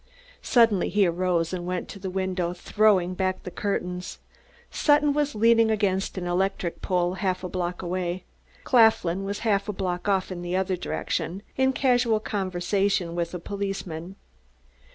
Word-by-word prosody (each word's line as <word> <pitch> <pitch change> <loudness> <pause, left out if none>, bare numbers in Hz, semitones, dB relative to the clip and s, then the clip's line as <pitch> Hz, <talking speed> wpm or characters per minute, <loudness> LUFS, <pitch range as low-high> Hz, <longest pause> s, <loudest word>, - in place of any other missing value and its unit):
Suddenly 230 -7 +3
he 205 -1 +3
arose 175 -1 0
and 175 -1 -4
went 180 0 -3
to 200 - -8
the 190 -1 -4
window, 185 -2 -1
throwing 190 -1 +2
back 185 0 -1
the 180 - -6
curtains. 180 -2 -3 0.5
Sutton 295 -1 +3
was 295 -2 0
leaning 230 +1 +4
against 200 -3 0
an 180 - -3
electric 180 0 -1
light - - -25
pole, 180 -1 0
half 185 -1 -2
a - - -2
block 180 0 -3
away; 180 0 -2 0.4
Claflin 220 -6 +3
was 200 +1 -4
half 200 -1 +1
a - - -1
block 185 0 -2
off 190 -1 +1
in 175 -1 -5
the 175 +1 -3
other 190 0 0
direction, 175 +1 -3
in 265 0 +3
casual 245 -4 +2
conversation 190 -2 -1
with 170 0 -2
a - - -4
policeman. 195 -2 -5
190 Hz, 160 wpm, -26 LUFS, 180-205 Hz, 0.5 s, leaning